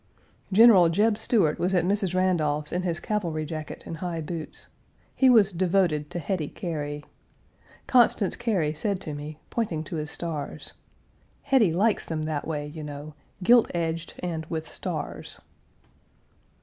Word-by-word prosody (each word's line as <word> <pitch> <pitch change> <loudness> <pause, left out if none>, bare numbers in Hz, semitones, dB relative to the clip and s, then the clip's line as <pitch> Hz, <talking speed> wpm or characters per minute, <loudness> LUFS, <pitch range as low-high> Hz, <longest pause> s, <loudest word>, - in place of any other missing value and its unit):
General 195 -4 +7
Jeb 210 +6 +3
Stuart 205 -8 +2
was 185 +2 +1
at 175 -1 +2
Mrs. 195 -1 0
Randolph's 155 -5 +1
in 180 - -1
his 175 -2 -1
cavalry 170 -7 -2
jacket 155 -1 -6
and 165 - -6
high 170 -1 -3
boots. 160 0 -6 0.5
He 265 - +5
was 215 -5 +6
devoted 175 -4 +1
to - - -5
Hetty 170 -1 -2
Cary. 150 -5 -5 0.8
Constance 235 -6 +3
Cary 190 -11 0
said 195 +5 -1
to 155 - -5
me, 150 +1 -7
pointing 180 -10 -1
to 160 - -5
his 150 -1 -4
stars, 160 -3 -5 0.7
"Hetty 265 -10 +4
likes 205 +6 +1
them 155 -2 -2
that 155 -2 -3
way, 150 -2 -2
you 150 +2 -8
know 150 0 -7 0.3
gilt 235 +4 +6
edged 165 -1 -2
and 165 -3 -2
with 160 -1 -4
stars." - - -5
170 Hz, 150 wpm, -26 LUFS, 155-195 Hz, 0.8 s, General